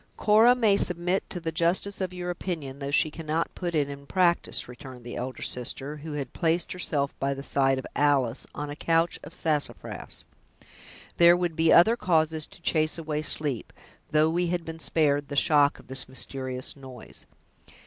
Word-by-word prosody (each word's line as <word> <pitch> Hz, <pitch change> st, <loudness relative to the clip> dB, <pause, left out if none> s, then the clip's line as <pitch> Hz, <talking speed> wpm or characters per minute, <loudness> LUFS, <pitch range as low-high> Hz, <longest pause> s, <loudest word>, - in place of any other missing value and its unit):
"Cora 220 Hz, +4 st, +5 dB
may 220 Hz, -5 st, +3 dB
submit 180 Hz, +1 st, -1 dB
to 180 Hz, -, -3 dB
the 165 Hz, -1 st, -3 dB
justice 175 Hz, +5 st, 0 dB
of 185 Hz, -1 st, -2 dB
your 180 Hz, -1 st, -4 dB
opinion 160 Hz, -7 st, -5 dB
though 140 Hz, -1 st, -4 dB
she 155 Hz, +1 st, +2 dB
cannot 160 Hz, +1 st, -2 dB
put 175 Hz, -2 st, -4 dB
it 145 Hz, -2 st, +2 dB
in 140 Hz, 0 st, -9 dB
practice," 175 Hz, -2 st, +1 dB
returned 125 Hz, 0 st, -11 dB
the 120 Hz, -, -7 dB
elder 130 Hz, +1 st, -5 dB
sister, 135 Hz, +4 st, -3 dB
who 150 Hz, +1 st, -7 dB
had 140 Hz, -4 st, -5 dB
placed 165 Hz, 0 st, 0 dB
herself 145 Hz, -6 st, -2 dB
by 135 Hz, 0 st, 0 dB
the 135 Hz, -, -7 dB
side 135 Hz, -1 st, +2 dB
of 130 Hz, -, -5 dB
Alice, 140 Hz, -4 st, +1 dB
on 145 Hz, 0 st, -4 dB
a -, -, -6 dB
couch 165 Hz, +2 st, +1 dB
of 155 Hz, -, -10 dB
sassafras; 150 Hz, -3 st, -2 dB, 0.9 s
"there 170 Hz, 0 st, +7 dB
would 175 Hz, -2 st, -1 dB
be 160 Hz, 0 st, +3 dB
other 220 Hz, +7 st, +7 dB
causes 160 Hz, -6 st, +1 dB
to 170 Hz, -, -17 dB
chase 155 Hz, 0 st, +1 dB
away 155 Hz, -2 st, -3 dB
sleep, 145 Hz, -4 st, -1 dB, 0.4 s
though 155 Hz, 0 st, +4 dB
we 175 Hz, +1 st, 0 dB
had 175 Hz, -1 st, -2 dB
been 165 Hz, +1 st, -7 dB
spared 145 Hz, -3 st, +1 dB
the 145 Hz, -, -6 dB
shock 145 Hz, 0 st, +4 dB
of -, -, -16 dB
this 130 Hz, 0 st, 0 dB
mysterious 130 Hz, -1 st, -2 dB
noise. 130 Hz, -4 st, -10 dB
155 Hz, 180 wpm, -27 LUFS, 140-170 Hz, 0.9 s, there